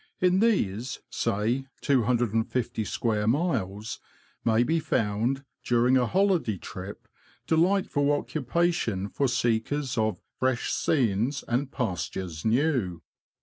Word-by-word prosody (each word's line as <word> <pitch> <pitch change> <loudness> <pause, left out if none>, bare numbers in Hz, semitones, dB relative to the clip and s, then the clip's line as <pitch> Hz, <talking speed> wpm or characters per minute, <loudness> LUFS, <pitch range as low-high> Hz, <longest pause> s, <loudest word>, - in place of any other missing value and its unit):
In 180 +1 +3
these, 125 - +1
say, 115 +7 0
250 120 -3 +1
square 105 -2 -1
miles, 115 - -1 0.4
may 115 +1 +3
be 165 +6 +1
found, 115 +1 0 0.2
during 120 +2 +3
a 125 -2 +3
holiday 185 - +2
trip, - - -8 0.4
delightful 160 -4 +2
occupation 145 - 0
for 140 - 0
seekers 125 +2 0
of 110 -1 0 0.2
"fresh 130 -2 0
scenes 125 0 +1
and 130 +3 -1
pastures 90 - -3
new." 115 - +1
125 Hz, 105 wpm, -27 LUFS, 110-145 Hz, 0.4 s, In